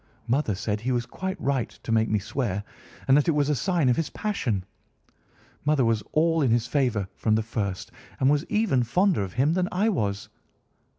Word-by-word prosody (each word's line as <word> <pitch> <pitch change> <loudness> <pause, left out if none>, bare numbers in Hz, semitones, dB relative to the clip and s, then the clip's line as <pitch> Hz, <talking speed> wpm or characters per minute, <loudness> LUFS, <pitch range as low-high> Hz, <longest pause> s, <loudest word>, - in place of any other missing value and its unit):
Mother 120 -3 0
said 105 +2 -2
he 130 +3 -1
was 120 -1 0
quite 190 +10 -5
right 135 -3 0
to - - -4
make 110 0 +2
me 105 - +2
swear, 105 -1 -2 0.4
and 135 - +6
that 145 - +3
it 165 - +4
was 145 -1 +1
a 150 - +2
sign 175 -1 +1
of 125 - +3
his 165 - -1
passion. 125 - -2 1.0
Mother 145 -3 +2
was 115 -2 +1
all 165 +1 +2
in 135 - +2
his 115 0 +2
favour 125 -10 0
from 110 -1 +1
the 110 - +1
first 100 -4 -4 0.3
and 130 - +3
was 145 +1 +3
even 210 - +1
fonder 180 - +2
of 95 -2 -4
him 140 +6 +2
than 180 0 0
I 205 +5 +2
was. 100 - -2
130 Hz, 200 wpm, -26 LUFS, 110-155 Hz, 1.0 s, and